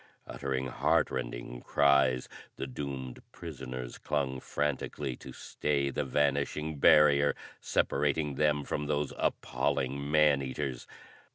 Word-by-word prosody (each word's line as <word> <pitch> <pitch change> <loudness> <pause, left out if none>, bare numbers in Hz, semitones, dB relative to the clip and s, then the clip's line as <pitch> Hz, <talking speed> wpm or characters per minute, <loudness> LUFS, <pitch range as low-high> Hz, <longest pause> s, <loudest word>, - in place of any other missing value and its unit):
Uttering 65 -1 -3
heart 65 - +1
rending - - -5
cries, 70 -3 +3 0.3
the - - -4
doomed 65 -1 -6
prisoners 65 -6 -7
clung 65 -3 -1
frantically 70 -2 -2
to - - -10
stay 70 -2 -1
the 75 - -1
vanishing 70 +2 0
barrier 75 -1 +6 0.2
separating 75 +1 0
them 75 0 +2
from 75 +1 -3
those 75 -1 -1
appalling 70 +2 -1
man 75 -2 +4
eaters. 65 -1 -4
70 Hz, 110 wpm, -30 LUFS, 65-75 Hz, 0.3 s, barrier